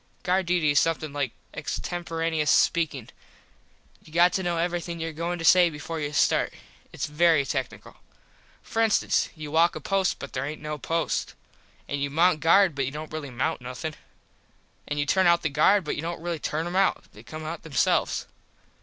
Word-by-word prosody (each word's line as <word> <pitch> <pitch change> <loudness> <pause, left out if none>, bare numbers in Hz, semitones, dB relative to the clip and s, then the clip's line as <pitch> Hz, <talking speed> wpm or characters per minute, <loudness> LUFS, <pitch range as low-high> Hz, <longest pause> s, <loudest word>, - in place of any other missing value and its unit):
Guard 185 0 +1
duty 170 -4 +2
is 145 - +5
something 155 -3 -1
like 140 -4 -1 0.2
extemperaneus 165 -3 -2
speakin. 150 -8 +2 0.9
You 155 - -17
got 175 +2 +4
to 190 - 0
know 175 -2 -1
everything 170 0 -2
your 165 0 -4
goin 170 +3 -3
to 165 - -4
say 180 -1 +6
before 160 +1 -6
you 145 -1 -3
start. 150 - +2 0.4
Its - - -3
very 155 -1 +3
tecknickle. - - -5 0.7
For 225 - -2
instance 220 -2 +2
you 155 -2 -7
walk 165 +2 +3
a - - -4
post 195 -2 0
but 140 - -9
there 130 - -2
aint 150 +2 -5
no 150 0 -5
post. 165 +3 -2 0.5
An 145 - -3
you 140 0 -1
mount 165 +3 +3
guard 170 +3 +5
but 140 -1 -1
you - - -2
dont 155 +2 -7
really 155 -3 -5
mount 130 +4 -2
nothin. 125 +6 -5 0.9
An 150 - -3
you 145 - +1
turn 190 +5 +3
out 170 0 +4
the 155 - +1
guard 180 +8 +4
but 150 - -3
you - - -4
dont 170 +1 -4
really 170 -1 -3
turn 155 +2 -2
em 175 +1 -4
out. 195 0 +2
They 105 - -13
come 155 +7 -8
out 160 +1 -5
them 160 - -12
selves. - - +1
160 Hz, 195 wpm, -26 LUFS, 150-175 Hz, 0.9 s, say